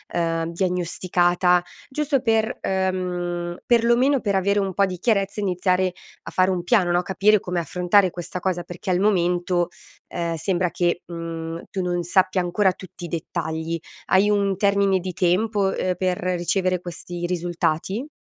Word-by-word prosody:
uhm, 165 -1 0
diagnosticata 180 0 +1 0.3
giusto 280 -1 0
per 225 0 +1
uhm, 180 -2 -2
perlomeno 240 +4 +3
per 205 -4 -1
avere 200 +2 +2
un 195 -1 -1
po' 200 +2 +3
di 185 -1 -5
chiarezza 200 0 0
e - - -2
iniziare 185 -1 +1 0.3
a - - -8
fare 185 0 +3
un 180 -2 -1
piano, 185 -3 +3
no, 175 +1 +3
capire 200 +3 +3
come 180 -1 -2
affrontare 180 +4 +3
questa 175 +1 -6
cosa, 180 -1 -1
perché 175 +2 -7
al 180 - +2
momento, 175 -3 +1 0.4
ehm, 170 -1 -3
sembra 180 +1 0
che, 175 0 0
mhmm, 165 -1 -6
tu 190 - -2
non 175 -1 -1
sappia 185 +2 +2
ancora 185 +2 +2
tutti 185 -1 -10
i - - -5
dettagli. 160 0 -3 0.3
Hai 195 +2 +4
un 200 -2 +2
termine 200 -1 +3
di 185 0 -5
tempo, 195 +4 +1
uhm, 185 -1 0
per 185 -1 0
ricevere 185 +1 0
questi 175 0 -6
risultati? 175 - -1
180 Hz, 160 wpm, -23 LUFS, 175-195 Hz, 0.4 s, Hai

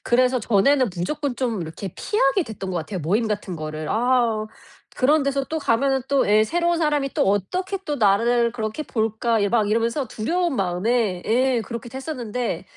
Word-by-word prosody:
그래서 250 +1 +2
전에는 240 +5 +3
무조건 260 - -2
좀 235 -7 -1
이렇게 165 +3 -7
피하게 380 -2 +1
됐던 200 -4 -6
것 180 - -3
같아요, 180 +3 -4
모임 205 +9 +1
같은 205 -4 -3
거를. 155 0 -5
아 235 -2 +1 0.5
그런 295 +3 +3
데서 275 0 0
또 320 +2 -3
가면은 265 0 +1
또 280 -1 +2
예. 215 +1 +5
'새로운 345 +5 0
사람이 295 -4 +1
또 - - +2
어떻게 365 - -1
또 295 -4 -2
나를 235 +2 +3
그렇게 220 +4 -3
볼까?' 225 -3 0
예 200 - +2
막 215 -1 +2
이러면서 230 +5 0
두려운 335 +8 -1
마음에 195 +1 0
예. 250 +1 +2
그렇기도 235 +2 -7
했었는데, 245 - -4
235 Hz, 365 characters per minute, -23 LUFS, 210-275 Hz, 0.5 s, 예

